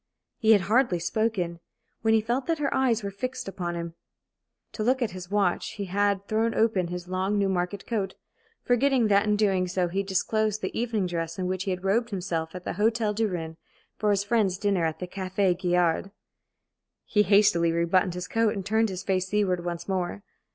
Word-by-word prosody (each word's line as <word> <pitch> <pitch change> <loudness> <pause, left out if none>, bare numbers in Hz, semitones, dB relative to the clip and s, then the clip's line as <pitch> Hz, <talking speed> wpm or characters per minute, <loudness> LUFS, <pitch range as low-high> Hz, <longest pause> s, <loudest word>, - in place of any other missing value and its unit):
He 220 -3 +6
had 205 - +4
hardly 220 0 +2
spoken, 180 -2 -1 0.4
when 225 0 +3
he 220 - +3
felt 240 +4 -2
that 330 -1 +1
her 290 -2 -1
eyes 245 -5 +2
were 200 - -3
fixed 255 +5 -5
upon 175 -3 -4
him. 170 -1 -5 0.8
To - - -6
look 255 +4 +2
at 225 - -2
his 180 -1 -8
watch, 200 -3 0
he 200 - -4
had 200 +1 0
thrown 225 +1 0
open 215 -5 +2
his 175 0 -6
long 190 +3 -1
Newmarket 190 0 -1
coat, 200 -5 -2 0.5
forgetting 245 -2 +2
that 200 +1 +4
in 210 0 +2 0.3
so 180 0 0
doing - - -3
he 195 - +1
disclosed 210 +2 0
the - - -3
evening 225 -4 0
dress 165 -2 -3
in 185 - -2
which 185 +1 -2
he - - -2
had 180 0 -3
robed 230 +5 +1
himself 175 -4 -3
at 180 - -7
the - - -3
Hôtel 220 +2 +1
du 220 +1 +1
Rhin 165 -4 -5 0.4
for 215 - +1
his 200 -1 +2
friend's 205 -4 +1
dinner 195 -4 +1
at 160 -1 -2
the 180 - -5
Café 185 0 0
Gaillard. 180 0 +1 1.0
He 210 - +2
hastily 200 -4 +4
rebuttoned 170 +2 +1
his 180 0 -5
coat, 225 -2 +1
and 195 -2 -5
turned 220 +2 +2
his 185 -1 -5
face 185 -1 0
seaward 190 -3 0
once 175 -1 -4
more. 190 +1 -2
195 Hz, 200 wpm, -26 LUFS, 180-215 Hz, 1.0 s, He